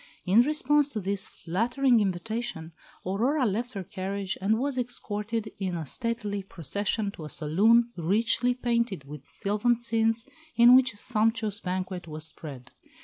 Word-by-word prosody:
In 195 +5 +6
response 295 +1 +2
to 215 - -2
this 200 +1 -2
flattering 240 +8 +1
invitation 200 -2 -3 0.3
Aurora 245 +10 +1
left 235 +4 -1
her 195 -3 -4
carriage 190 +1 -4
and 210 +3 +2
was 275 +3 -1
escorted 225 -3 -3
in 175 -5 -2
stately 220 - -2
procession 200 - -2
to 160 - -9
a - - -7
saloon, 220 +12 +3
richly 230 +8 +2
painted 235 - -1
with 140 0 -11
sylvan 210 +4 +1
scenes, 225 0 +1 0.3
in 240 +1 +8
which 260 -3 +4
a - - -13
sumptuous 220 -2 +1
banquet 185 -2 -4
was 155 0 -6
spread. 140 -5 -8
210 Hz, 145 wpm, -27 LUFS, 185-235 Hz, 0.3 s, in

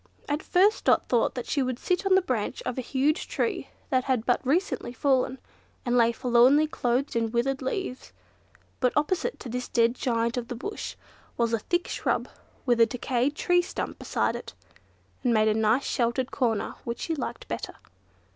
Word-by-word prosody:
At 295 +1 -1
first 395 +4 +3
Dot - - +4
thought 240 -2 +1
that 245 - -4
she 285 - 0
would 255 -2 -1
sit 360 +7 0
on 380 - +5
the 380 - +4
branch 240 - -2
of 250 - -3
a 260 - -2
huge 280 +6 0
tree - - -2 0.2
that 255 -1 +2
had 250 -4 0
but 245 - +2
recently 275 -3 0
fallen, 260 0 +1 0.5
and 245 0 +1
lay 235 -1 +5
forlornly 250 +5 +4
clothed 255 -2 -1
in 230 -1 +1
withered 255 +4 0
leaves; 260 -1 -4 0.7
but 250 -1 +2
opposite 370 +10 0
to - - -7
this 250 +1 -4
dead 235 0 +3
giant 235 -1 -1
of 240 -1 -3
the 245 - -5
Bush 405 - -5 0.4
was 235 -1 +1
a 230 - +2
thick 345 +10 -1
shrub - - -1 0.4
with 240 -2 +3
a 230 - +7
decayed 250 +3 -1
tree 355 +2 +3
stump 350 - -5
beside - - 0
it, - - -8 0.7
that 250 - +1
made 220 -2 +4
a 215 - +4
nice 220 +5 +2
sheltered 245 +1 0
corner 230 -5 0
which 235 0 -4
she 330 - -1
liked 305 - -5
better. - - -5
250 Hz, 185 wpm, -27 LUFS, 235-285 Hz, 0.7 s, a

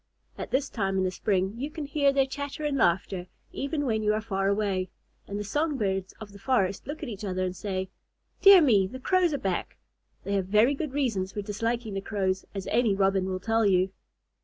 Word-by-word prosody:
At - - -6
this 275 +2 +1
time 195 -6 -1
in 190 - +2
the 185 - 0
spring, 190 0 0
you 275 +5 -3
can 300 -1 -6
hear 280 0 +2
their 275 -1 +3
chatter 285 +2 -5
and 290 -2 0
laughter, 185 -4 +1 0.2
even 290 +1 -2
when 220 -4 0
you 210 0 +2
are - - 0
far 195 -3 -1
away; 200 -2 0 0.4
and 200 - -4
the - - -2
song 295 +7 -1
birds 195 -4 -1
of 215 -2 -9
the 200 - -13
forest 195 -3 0
look 300 +2 -6
at - - -3
each 210 -2 -7
other 185 -2 -2
and 185 0 -2
say, 190 -1 -4 0.5
"Dear 395 -3 +9
me! 205 -9 +4
The 260 +7 -8
Crows 365 +4 +2
are 285 - 0
back." 190 -7 -3 0.5
They 200 - -3
have 195 -2 0
very 215 +7 +4
good 285 -1 -4
reasons 215 -10 -1
for 205 - -4
disliking 225 +2 -2
the 195 - -2
Crows, 190 -2 -1
as 195 -1 -4
any 230 -4 +3
Robin 195 -1 +2
will 185 0 -2
tell 225 +3 +1
you. 190 -2 +3
210 Hz, 220 wpm, -27 LUFS, 190-265 Hz, 0.5 s, Dear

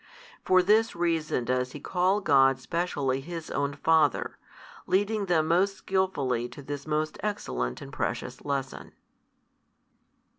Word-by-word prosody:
For 185 0 +4
this 220 +4 +3
reason 165 -7 0
does 125 0 -1
He 145 - -7
call 185 +6 +1
God 135 -5 +4
specially 145 -4 -1
His 165 +2 -7
own 140 0 -1
Father, 155 -2 +2 0.5
leading 205 +1 +1
them 160 -3 +2
most 190 +4 +2
skilfully 140 -13 -1
to 130 +4 -11
this 145 +1 -6
most 155 0 -1
excellent 65 - -3
and - - -11
precious - - -3
lesson. 140 -2 -4
155 Hz, 125 wpm, -27 LUFS, 135-185 Hz, 0.5 s, For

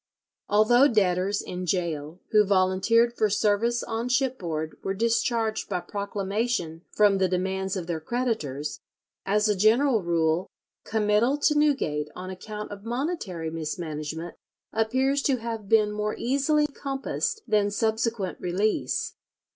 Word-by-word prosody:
Although 240 +6 +5
debtors 195 -3 +1
in 180 0 -5
gaol 170 -2 -2
who 215 -1 +6
volunteered 195 +4 +3
for 215 - +2
service 210 +4 +1
on 230 +2 -3
shipboard 185 - -1
were 195 - -2
discharged 230 0 0
by 185 -3 -1
proclamation 200 -1 -2
from 205 -2 +3
the 190 - +3
demands 190 +1 -1
of 180 -3 -3
their 170 -2 -3
creditors, 155 - -2 0.5
as 210 +2 +3
a 210 - +2
general 225 +4 +4
rule 170 0 +1 0.4
committal 220 +5 +2
to 300 - +3
Newgate 255 - +1
on 185 +1 -6
account 210 +3 -7
of 200 0 -8
monetary 230 - -3
mismanagement 160 0 -4 0.4
appears 260 +5 +1
to 275 -2 +2
have 225 -3 -5
been 215 -2 +4
more 210 0 -2
easily 280 +4 +2
compassed 280 +10 -3
than 210 -1 +2
subsequent 220 -2 -1
release. 190 +5 -1
210 Hz, 130 wpm, -26 LUFS, 180-235 Hz, 0.5 s, who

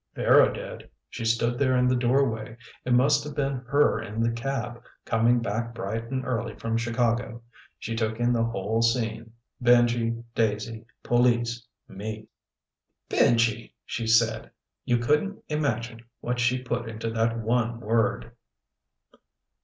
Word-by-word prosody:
Vera - - +5
did. - - -8 0.2
She 115 - -6
stood 115 +2 +1
there 130 -2 +3
in 125 0 +3
the 130 - +3
doorway. 120 -2 0 0.3
It 125 - +1
must 140 +3 +4
have 150 -1 -7
been 140 -1 -1
her 140 -4 +3
in 110 0 -6
the 115 - +2
cab, 120 0 -4 0.2
coming 115 +2 +2
back 115 +2 -3
bright 115 +3 -4
and 130 -1 -3
early 125 -3 -2
from 115 0 -3
Chicago. 115 0 -1 0.3
She 115 - -5
took 110 0 -2
in 120 0 +2
the 115 -1 +2
whole 110 0 -1
scene. 115 -1 0 0.3
Benji. 120 -1 +3
Daisy. 110 0 -1 0.2
Police. 120 -1 +1 0.2
Me. 110 +2 -7 0.8
"Benji!!!" 115 -1 +2
she 115 -2 -4
said. 115 0 +2 0.4
You 120 - +2
couldn't 150 +12 0
imagine 120 -6 -2 0.2
what 125 0 -3
she 125 +1 +1
put 120 -2 -3
into 115 0 -4
that 115 0 0
one 115 +1 0
word. 115 +1 0
115 Hz, 140 wpm, -26 LUFS, 115-125 Hz, 0.8 s, Vera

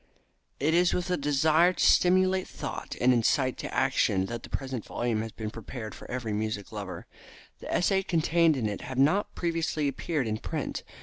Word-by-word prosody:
It 150 +4 +2
is 175 +1 +3
with 180 0 -2
a - - +3
desire 155 +4 +3
to - - +1
stimulate 185 +1 +4
thought - - -6
and 125 +1 +4
incite 130 +2 +2
to - - -5
action 110 -8 +2
that 115 +3 -5
the - - -11
present 130 -5 -4
volume 120 -3 -2
has 110 0 -5
been 110 -1 -6
prepared 110 -1 -7
for - - -12
every 120 -4 -3
music 110 -1 -3
lover. 100 -3 -6 0.5
The - - -7
essays 190 +2 +2
contained 165 -2 +3
in 115 -4 0
it 100 -2 -4
have 130 0 -6
not 155 +10 +2
previously 165 -3 -1
appeared 140 +1 -2
in 110 -1 -2
print. - - -4
135 Hz, 185 wpm, -28 LUFS, 110-170 Hz, 0.5 s, stimulate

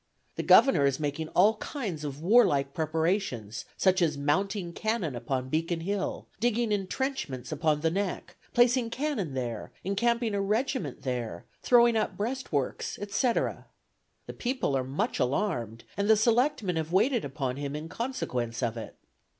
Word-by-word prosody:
The - - -2
Governor 150 - +6
is 135 0 0
making 150 +1 -2
all 210 +4 +5
kinds 205 - -4
of 145 0 -5
warlike 170 - +4
preparations, 160 - -1
such 185 -1 +3
as 155 -4 +2
mounting 175 +5 0
cannon 210 - -1
upon 130 +2 -3
Beacon 165 +3 -1
Hill, 195 +3 -2
digging 235 0 +1
intrenchments 200 - -2
upon 155 0 +1
the 160 0 +2
Neck, 195 +1 -3 0.2
placing 240 0 +3
cannon 230 - -2
there, 120 -4 -4
encamping 230 +3 +1
a 200 - 0
regiment 210 - -1
there, 120 -9 -3 0.2
throwing 240 -1 +5
up 220 - 0
breast 255 +6 -3
works, 140 -4 -2
etc. 205 +4 0 0.6
The - - -7
people 250 - -1
are 130 - +1
much 135 +3 -2
alarmed, 125 - -1
and 200 +1 -1
the 220 - +7
selectmen 230 - +2
have 160 0 -2
waited 225 +6 +3
upon 135 -2 -3
him 140 0 -4
in 155 +2 -5
consequence 135 - -3
of 115 -1 -1
it. 115 - -7
175 Hz, 150 wpm, -28 LUFS, 140-225 Hz, 0.6 s, the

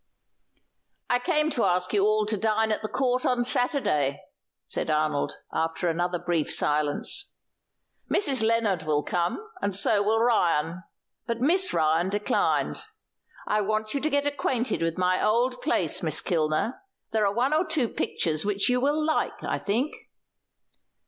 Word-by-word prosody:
"I 245 - +3
came 305 +2 0
to 240 - 0
ask 180 0 0
you 200 -2 +3
all 215 0 +2
to 215 +1 0
dine 220 +1 +1
at 215 - -1
the 215 - -3
Court 255 -1 0
on 250 -1 +1
Saturday," 195 - 0 0.4
said - - -1
Arnold, 150 -1 0 0.2
after 165 +2 -1
another 175 +2 0
brief 175 -3 -1
silence. 150 0 +1 0.7
"Mrs. 275 - +2
Lennard 220 -5 +1
will 150 -1 0
come, 175 - -2
and 200 - 0
so 200 +1 +3
will 215 +2 +2
Ryan; 175 -7 +1 0.5
but 235 -1 -2
Miss 360 +9 +2
Ryan 160 +2 +1
declined. 205 +1 0 0.6
I 210 0 +1
want 215 +1 -1
you 280 - -1
to 310 - +1
get 285 -1 0
acquainted 260 -6 -1
with 165 0 -1
my 185 0 +1
old 245 +4 +1
place, 285 - 0
Miss - - +2
Kilner; 160 +6 -1 0.3
there 220 -1 +1
are 200 - -1
one 255 +5 +1
or 315 +3 +3
two 315 -8 0
pictures 155 -7 -1
which 205 +1 +1
you 250 0 +2
will 295 +3 +1
like, 315 0 0
I - - -2
think." 235 +9 -1
215 Hz, 155 wpm, -26 LUFS, 175-250 Hz, 0.7 s, I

